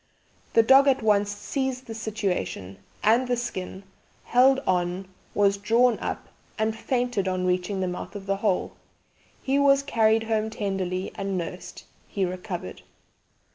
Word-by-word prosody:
The 230 - +6
dog 270 +4 +6
at 265 -3 +3
once 205 -1 +3
seized 260 +5 -3
the 230 - -7
situation 195 - -3 0.2
and 235 +4 +4
the 245 -1 0
skin 190 -5 -5 0.4
held 260 +2 +4
on, 180 +1 0 0.3
was 200 -1 +3
drawn 230 +4 +3
up, - - -5 0.3
and 220 0 0
fainted 245 -4 -1
on 185 -1 -1
reaching 185 +2 0
the 185 - 0
mouth 180 +3 -6
of 200 -1 -7
the 195 0 0
hole. 200 -2 0 0.7
He 270 +1 +1
was 275 0 +4
carried 225 -4 +2
home 220 -1 0
tenderly 190 -3 -3
and 195 -2 -3
nursed; 180 +1 -6 0.2
he 195 -2 -1
recovered." 180 - -6
205 Hz, 145 wpm, -25 LUFS, 185-240 Hz, 0.7 s, The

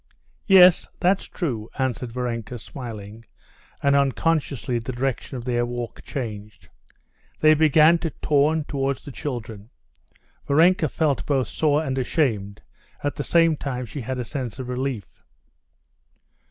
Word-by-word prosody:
"Yes, 185 -3 +7
that's 190 +1 +2
true," 120 - -4
answered 125 -3 -2
Varenka 120 -1 -4
smiling, 110 -3 -9 0.6
and 140 0 +4
unconsciously 140 -1 0
the 115 +3 -5
direction 130 +1 -3
of 120 - -7
their 120 -1 +1
walk 120 -1 -5
changed. 105 -5 -7 0.7
They 155 0 +6
began 155 +2 +5
to 165 - -2
turn 150 +1 +1
towards 140 -2 -2
the 145 - -7
children. 115 -6 -6 0.8
Varenka 160 +2 +4
felt 150 -2 0
both 135 -7 +1
sore 150 +6 +1
and 135 -3 -2
ashamed; 110 -8 -1 0.4
at 145 - 0
the 145 - -4
same 165 0 +3
time 130 -3 -4
she 135 +5 -7
had 130 +2 -4
a 125 - -3
sense 125 -3 -5
of 130 -2 -6
relief. 125 -5 -4
130 Hz, 135 wpm, -23 LUFS, 120-150 Hz, 0.8 s, Yes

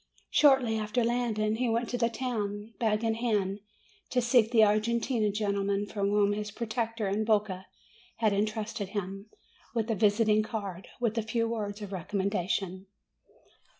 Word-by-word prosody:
Shortly 265 -6 +4
after 215 +3 0
landing, 225 -2 0
he 250 0 0
went 230 +1 0
to 245 - -1
the 230 0 +3
town, 220 -3 -3
bag 220 -2 +1
in 225 -1 +2
hand, 210 -4 0 0.5
to 255 - +1
seek 235 -2 +4
the 230 -2 +5
Argentine 215 +1 +2
gentleman 200 -1 0
for 205 - -8
whom 205 0 +3
his 210 0 -3
protector 225 0 -2
in 200 +3 0
Boca 205 -4 0 0.5
had 215 -3 +2
intrusted 215 0 -2
him 195 +2 -5 0.5
with 225 0 0
a - - +1
visiting 215 +1 +3
card, 200 -5 -5
with 230 -2 0
a - - +1
few 230 +1 -1
words 210 -2 -4
of 200 - -7
recommendation. 190 0 -2
215 Hz, 150 wpm, -29 LUFS, 205-230 Hz, 0.5 s, the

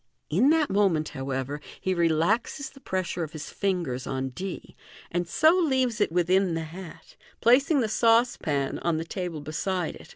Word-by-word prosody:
In 215 - +4
that 315 -2 +3
moment, 190 -6 +2
however, 135 +2 -4
\ - - -21
e 190 - +2
relaxes 175 - +1
the 275 - -16
pressure 185 -7 -2
of 155 0 -7
his 155 -2 -7
fingers 175 -11 -2
on 130 0 -2
d, 185 +8 -7 0.4
and 175 0 -1
so 315 - +4
leaves 260 - +1
it - - +2
within 180 +1 +2
the 165 - -2
hat, 170 +2 -11 0.2
placing 270 +5 +4
the 225 - +1
saucepan 225 - +2
on 170 -2 0
the 165 - -3
table 175 -3 -4
beside 170 +3 -2
it. - - -14
180 Hz, 170 wpm, -26 LUFS, 155-225 Hz, 0.4 s, In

